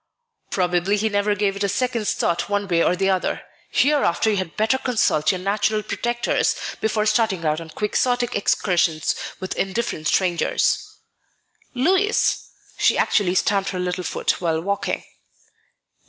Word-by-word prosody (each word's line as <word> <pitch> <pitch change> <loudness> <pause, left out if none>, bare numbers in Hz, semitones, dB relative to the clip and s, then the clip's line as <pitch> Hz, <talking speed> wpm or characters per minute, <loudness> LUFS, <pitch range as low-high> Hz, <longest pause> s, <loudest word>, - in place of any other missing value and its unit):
"Probably 180 +2 +1
he 220 +2 0
never 205 0 +1
gave 200 -1 0
it 200 - -3
a 200 - +1
second's 235 0 -1
thought 170 +2 -1
one 205 0 -1
way 170 -2 +2
or 180 - +2
the 195 +1 +1
other. 185 -1 -1 0.3
Hereafter 260 - +2
you 205 - 0
had 185 -4 -4
better 225 +5 +2
consult 215 - +2
your 185 - -2
natural 205 +3 0
protectors 240 +2 0 0.3
before 215 -1 0
starting 215 -5 +1
out 155 +1 0
on 165 - -9
Quixotic 245 +6 0
excursions 175 -5 +1 0.3
with 185 - -4
indifferent 195 -5 -2
strangers." 175 -3 +1 0.8
"Louis!" 380 - +2 0.3
She - - +3
actually 185 -4 +2
stamped 195 +1 +1
her 185 - -4
little 180 0 -2
foot - - -1
while 165 -2 0
walking. 200 +4 -2
200 Hz, 145 wpm, -22 LUFS, 180-220 Hz, 0.8 s, She